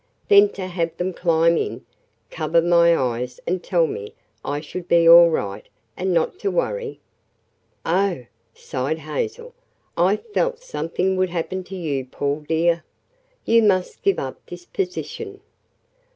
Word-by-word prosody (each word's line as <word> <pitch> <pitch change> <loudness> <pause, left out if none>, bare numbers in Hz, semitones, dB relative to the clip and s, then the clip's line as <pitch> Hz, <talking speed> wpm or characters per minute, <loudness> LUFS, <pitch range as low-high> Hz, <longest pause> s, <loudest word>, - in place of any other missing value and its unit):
Then 405 0 +7
to 190 - -5
have 170 -2 -3
them 180 +1 -2
climb 170 -1 +2
in, - - -3 0.5
cover 165 +1 +1
my 170 0 +4
eyes 125 0 -2
and 180 +1 -1
tell 175 -3 +2
me 105 -9 -6 0.3
I 145 +1 -3
would 180 -1 -5
be 170 -1 +4
all 170 0 +9
right, 100 -11 -3 0.3
and 185 +1 -1
not 170 - 0
to 400 - -1
worry!" - - -2 0.9
"Oh," 180 -6 0 0.3
sighed 135 +4 -3
Hazel, 160 - -5 0.4
"I 180 +4 +3
felt 470 +2 -1
something 190 - -2
would 185 0 +1
happen 180 +2 -3
to 190 - -8
you, 145 -7 -2
Paul, 140 +3 -2
dear. 165 +1 +1 0.6
You 230 0 +5
must 190 -4 +1
give 395 -1 +2
up - - -5
this 355 - -10
position." 400 +2 -5
175 Hz, 145 wpm, -22 LUFS, 160-200 Hz, 0.9 s, all